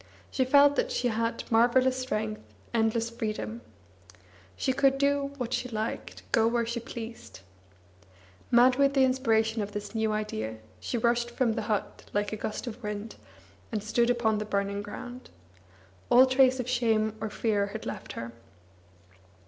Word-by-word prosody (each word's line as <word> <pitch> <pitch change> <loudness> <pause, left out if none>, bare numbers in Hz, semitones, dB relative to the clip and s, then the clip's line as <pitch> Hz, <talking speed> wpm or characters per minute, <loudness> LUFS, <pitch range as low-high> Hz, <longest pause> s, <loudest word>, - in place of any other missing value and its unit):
She 260 - +1
felt 285 +2 +5
that - - +1
she 255 - 0
had 230 +1 -1
marvellous 245 +3 +4
strength, 215 -4 -2 0.3
endless 230 0 +1
freedom. 210 - -4 0.9
She 260 - 0
could 275 0 +3
do 280 0 +1
what 250 -2 -3
she 250 0 -1
liked, 220 -1 -4
go 225 -1 +4
where 235 0 +1
she 235 +1 -3
pleased. 230 - -9 1.1
Mad 250 +1 +5
with 280 0 +3
the 270 - +5
inspiration 225 -4 +2
of 205 0 -5
this 205 0 -5
new 220 -1 0
idea, 110 - -3 0.2
she 240 - -3
rushed 235 +1 +1
from 240 -1 +1
the 225 - -2
but 210 -3 -2
like 205 +1 0
a - - 0
gust 215 +2 -4
of 240 0 -7
wind, 210 0 -5 0.5
and 215 -3 -2
stood 235 +3 +2
upon 225 -3 +2
the - - -2
burning 200 -1 -1
ground. 245 +5 -8 0.8
All 255 +2 +8
trace 260 0 +4
of 250 - -3
shame 225 -3 +1
or 220 - -2
fear 205 -2 0
had 220 +2 -7
left - - -6
her. 115 0 -6
230 Hz, 160 wpm, -28 LUFS, 215-255 Hz, 1.1 s, All